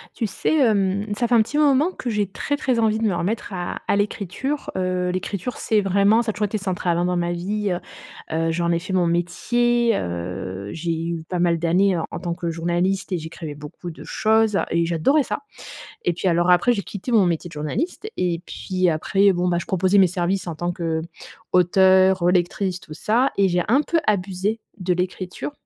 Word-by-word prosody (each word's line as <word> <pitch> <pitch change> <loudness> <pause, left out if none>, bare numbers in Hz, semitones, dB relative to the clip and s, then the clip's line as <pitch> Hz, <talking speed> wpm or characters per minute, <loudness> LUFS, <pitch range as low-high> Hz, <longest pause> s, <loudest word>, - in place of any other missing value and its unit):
Tu 225 - -1
sais, 315 +10 0
hem, 200 -5 +2
ça 240 - +1
fait 245 - +4
un 225 - +6
petit 280 +7 -2
moment 295 +3 +4
que 245 - -5
j'ai 210 -2 0
très, 285 +9 -3
très 255 -5 0
envie 220 -1 +2
de 225 - 0
me 195 -5 +1
remettre 205 +3 -2
à 175 -1 -4
à - - +3
l'écriture. 205 +7 -2
Heu, 185 -1 0
l'écriture, 185 +5 -3
c'est 220 - +1
vraiment 200 +3 +3
ça 230 -2 -1
a - - -11
toujours 210 0 -1
été 215 - -2
central, 185 -3 -1
hein, 175 - +1
dans 180 0 0
ma 175 0 0
vie, 200 +4 -2
heu 175 - -1 0.6
heu, 165 0 +1
j'en 170 +1 0
ai 170 - +1
fait 185 +3 -7
mon 180 -2 +2
métier, 235 +7 +1
heu, 90 +3 -5
j'ai 170 +1 -3
eu 165 -1 -3
pas 180 - -2
mal 170 -1 +2
d'années 180 +3 +2
en 165 - -2
en - - -5
tant 170 -2 -3
que 170 0 -3
journaliste 175 +4 -1
et - - +1
j'écrivais 160 -1 -7
beaucoup 150 +4 -9
de 165 - -10
choses 220 -1 +2
et 170 0 +1
j'adorais 175 - +2
ça - - -3 0.7
et 175 - +2
puis, 175 +3 -1
alors, 175 +1 +2
après, 180 +7 +5
j'ai 205 -4 -2
quitté 200 +6 -7
mon 210 -5 +5
métier 175 0 -1
de - - -15
journaliste 165 - -3
et 175 -2 0
puis, 185 -1 -1
après, 195 +5 +3
bon, 180 0 0
bah, 175 -1 +1
je - - -8
proposais 190 +2 +2
mes 190 - +7
services 180 +2 -1
en 170 - -4
tant 175 +3 -2
qu'auteur, 180 +3 +2
relectrice, 180 +1 +1
tout 155 - -11
ça, 240 - +1
et 195 -1 +4
j'ai 175 0 +1
un 265 +6 +4
peu 335 +3 0
abusé 200 +2 0 0.2
de 180 -1 0
l'écriture, 180 +7 -4
185 Hz, 210 wpm, -22 LUFS, 175-210 Hz, 0.7 s, mes